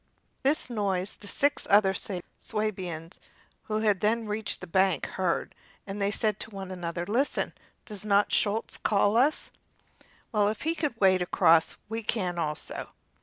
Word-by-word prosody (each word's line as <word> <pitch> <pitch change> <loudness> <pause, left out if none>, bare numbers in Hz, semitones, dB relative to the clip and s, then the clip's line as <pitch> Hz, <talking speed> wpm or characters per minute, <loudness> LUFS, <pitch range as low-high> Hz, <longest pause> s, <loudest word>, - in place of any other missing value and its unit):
This 280 +3 +1
noise 200 -5 -1
the 205 - -11
six 285 +7 +1
other 200 -1 +5
Swabians, 185 -2 -4 0.5
who 215 -1 +2
then 215 +4 0
reached 210 +1 -2
the - - -7
bank, 190 -2 +2
heard, 185 -3 -1 0.3
and 200 +1 -5
they 200 - +2
said 210 0 0
to - - -6
one 195 -3 -7
another: 175 -1 -4
"Listen! 245 +9 0 0.3
does 210 -3 -7
not 205 -1 +3
Schulz 215 +2 0
call 205 0 +3
us? 270 +6 +2 0.8
Well, 210 -3 +3
if 210 0 -2
he 325 +2 +1
could 300 -8 -2
wade 185 -2 +5
across 165 -2 +4
we 225 +1 -3
can 185 -6 -1
also." 150 -2 -4
205 Hz, 150 wpm, -28 LUFS, 185-220 Hz, 0.8 s, other